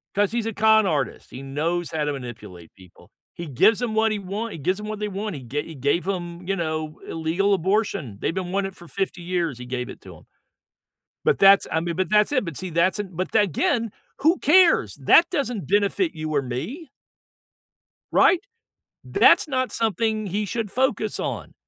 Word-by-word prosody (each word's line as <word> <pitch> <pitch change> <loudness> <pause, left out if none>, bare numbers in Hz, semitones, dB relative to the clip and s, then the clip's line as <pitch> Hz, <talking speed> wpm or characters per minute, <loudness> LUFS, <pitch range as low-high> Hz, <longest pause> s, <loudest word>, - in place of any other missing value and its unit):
'Cause 205 0 +2
he's 235 -1 -1
a 225 - -3
con 220 0 +4
artist; 150 -6 -2
he 130 - -8
knows 160 +6 -2
how 155 -2 -1
to 145 - -1
manipulate 105 -10 -9
people. 90 -2 -19 0.2
He 170 - -6
gives 180 - +3
'em 230 -3 -2
what 220 0 +2
he 210 - -1
want 205 +4 -5
He - - -7
gives 185 +8 -1
'em 210 - -7
what 215 -1 -5
they 210 - -2
want, 200 -2 -4
he 135 - -7
ga 140 +5 -3
he 160 - -10
gave 145 +7 0
'em, 175 -2 -4
you 195 - 0
know, 155 -3 -3
illegal 170 +5 0
abortion, 185 - -1
they've - - -1
been 185 -1 -4
wanting 195 0 -1
it - - -24
for 175 - -14
50 190 -2 -3
years, 170 -6 -2
he 125 - -7
gave 125 0 -4
it - - -11
to - - -12
'em. - - -19 1.0
But - - +3
that's 195 0 +6
I 160 - +1
mean, 170 0 -3
but 185 -3 -1
that's 210 +4 +3
it 255 -8 +1
but 165 -4 -6
see, 185 -1 -5
that's 170 +5 +1
an 200 -2 -3
but 185 +3 -4
again, 210 - +1 0.3
who 325 +5 +3
cares? 350 +4 +4
That 335 - +5
doesn't 245 - -2
benefit 205 - +1
you 155 0 -4
or 140 - +2
me. 160 - -6 1.2
Right? 365 - +5 0.7
That's - - +4
not 255 -2 -1
something 220 0 0
he 205 +3 -2
should 215 0 -3
focus 265 +5 0
on. - - -5
190 Hz, 200 wpm, -23 LUFS, 155-215 Hz, 1.2 s, that's